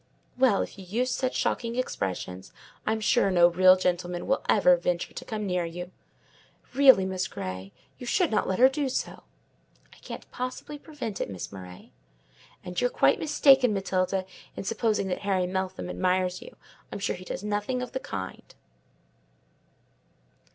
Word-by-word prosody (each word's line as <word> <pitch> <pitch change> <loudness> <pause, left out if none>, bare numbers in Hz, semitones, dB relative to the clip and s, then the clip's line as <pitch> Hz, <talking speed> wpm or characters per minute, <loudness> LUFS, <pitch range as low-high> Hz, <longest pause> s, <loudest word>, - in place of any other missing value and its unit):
"Well, 250 -6 +3
if - - -10
you - - -8
use 235 +8 -1
such 255 -1 -1
shocking 230 -1 -1
expressions, 95 - -3 0.4
I'm 220 0 0
sure 215 -1 +3
no 175 -2 +6
real 185 +1 +6
gentleman 180 -1 -1
will 270 - 0
ever 180 -4 +6
venture 175 0 -2
to - - -8
come 215 -2 -4
near 180 -2 0
you. 175 +2 -6 0.8
Really, 265 -7 +7
Miss 190 0 -2
Grey, 95 +1 -6 0.3
you 250 - -8
should 350 +6 +2
not 215 - +1
let 190 - 0
her 255 - +8
do 275 0 -1
so." 255 - -4 0.7
"I - - -18
can't - - -9
possibly 255 +4 -5
prevent 255 - -6
it, - - -2
Miss 95 -3 -6
Murray." 90 -2 -11 0.7
"And 180 0 -3
you're 245 - +3
quite - - +3
mistaken, 270 -6 +4
Matilda, 190 -1 0 0.3
in - - -5
supposing 215 0 0
that 180 - -2
Harry 195 -3 0
Meltham 190 0 -3
admires 185 0 0
you: - - -12 0.4
I - - -5
assure 200 - -1
you - - -11
he 185 - -11
does 185 - -5
nothing 210 +5 -1
of 250 - -7
the 260 - -3
kind." 95 - -7
195 Hz, 165 wpm, -27 LUFS, 180-245 Hz, 0.8 s, her